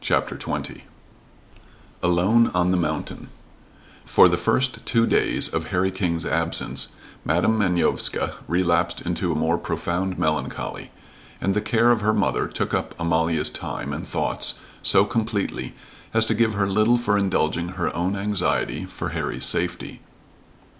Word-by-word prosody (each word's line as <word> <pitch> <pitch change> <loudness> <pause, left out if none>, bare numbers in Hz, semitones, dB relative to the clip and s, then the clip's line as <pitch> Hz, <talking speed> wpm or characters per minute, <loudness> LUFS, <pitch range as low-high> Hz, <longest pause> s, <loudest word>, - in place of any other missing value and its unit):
CHAPTER - - 0
XX - - -5 1.2
ALONE 95 +7 +3
ON 90 0 +2
THE 90 - +2
MOUNTAIN 85 - -3 0.8
For - - +6
the 85 - +2
first 130 +9 0
two 115 -1 +2
days - - +2
of - - -3
Harry 95 +1 0
King's 90 -4 -1
absence 85 0 0 0.3
Madam 90 +8 +1
Manovska 90 -4 +1
relapsed 85 0 +1
into 90 0 -2
a - - -1
more 80 +2 +1
profound 85 +3 -2
melancholy, 75 -4 -2 0.5
and 95 - 0
the 105 - 0
care 115 +2 +3
of 115 -3 +2
her 110 +1 +2
mother 100 - 0
took - - -3
up - - -2
Amalia's 80 0 0
time - - -5
and - - -6
thoughts - - -1 0.3
so 95 - +5
completely 110 -2 -2 0.4
as 110 0 +6
to 110 - +1
give 110 -1 +1
her 100 -1 +1
little 110 +5 +3
for 120 -4 0
indulging 95 -3 0
her 90 -3 -2
own 90 +4 -1
anxiety 100 0 0
for - - -6
Harry's 65 - -2
safety. 90 +1 -1
95 Hz, 145 wpm, -23 LUFS, 85-110 Hz, 1.2 s, For